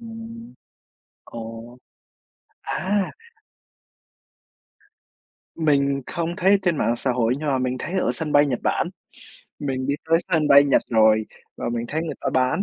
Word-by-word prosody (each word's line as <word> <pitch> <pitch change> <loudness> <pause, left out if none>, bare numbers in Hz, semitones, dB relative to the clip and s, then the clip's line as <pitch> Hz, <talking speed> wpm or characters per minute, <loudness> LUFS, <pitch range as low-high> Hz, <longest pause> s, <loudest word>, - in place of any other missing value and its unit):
Ừm. 230 - -10 0.7
Ồ. 115 +1 -9 0.9
À. 195 0 -1 2.4
Mình 140 -3 +1
không 170 -1 -2
thấy 195 +1 +4
trên 175 -4 +1
mạng 120 - +1
xã 130 - -1
hội 120 -1 +1
nhưng 150 0 -3
mà 135 -2 +2
mình 130 0 -1
thấy 175 - -5
ở - - +1
sân 155 -2 -4
bay 145 0 +5
Nhật 125 -4 -1
Bản, - - +1 0.7
mình 130 -2 -3
đi 140 - +1 0.2
tới 165 - +6
sân 155 -3 +3
bay 140 0 +8
Nhật 140 - +3
rồi 110 -1 +4 0.3
và - - -3
mình 120 -1 -2
thấy 160 +2 -2
người 165 - -4
ta - - -1
bán 130 +8 +2
140 Hz, 150 wpm, -23 LUFS, 125-170 Hz, 2.4 s, bay